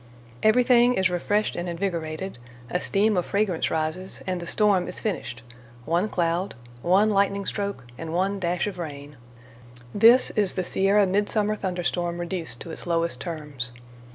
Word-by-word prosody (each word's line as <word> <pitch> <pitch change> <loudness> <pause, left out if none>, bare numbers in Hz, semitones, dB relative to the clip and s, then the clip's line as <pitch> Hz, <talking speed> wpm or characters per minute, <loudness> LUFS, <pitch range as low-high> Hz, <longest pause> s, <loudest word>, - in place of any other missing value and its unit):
Everything 245 +2 +5
is 190 -3 +2
refreshed 205 +4 0
and 175 +1 -3
invigorated, 170 -3 -3 0.3
a 180 - +1
steam 210 +1 +2
of 180 - +1
fragrance 200 -4 0
rises, 160 +4 -3
and 185 -1 -2
the 170 - -7
storm 200 -4 +3
is 180 - -6
finished—one 125 - -4
cloud, 175 +1 -1 0.3
one 195 - +4
lightning 200 0 +1
stroke, 200 -9 -3 0.2
and 165 -1 -5
one 190 +4 0
dash 175 -1 0
of 200 -4 -5
rain. 145 -3 -7 0.8
This 230 +5 +6
is 205 -4 +1
the 185 - 0
Sierra 195 +3 +3
mid 200 +2 +1
summer 215 -1 +1
thunder 180 -3 -3
storm 175 0 -1
reduced 175 -1 -4
to 170 - -7
its 160 - -5
lowest 165 -6 0
terms. 145 -7 -4
180 Hz, 155 wpm, -25 LUFS, 165-200 Hz, 0.8 s, This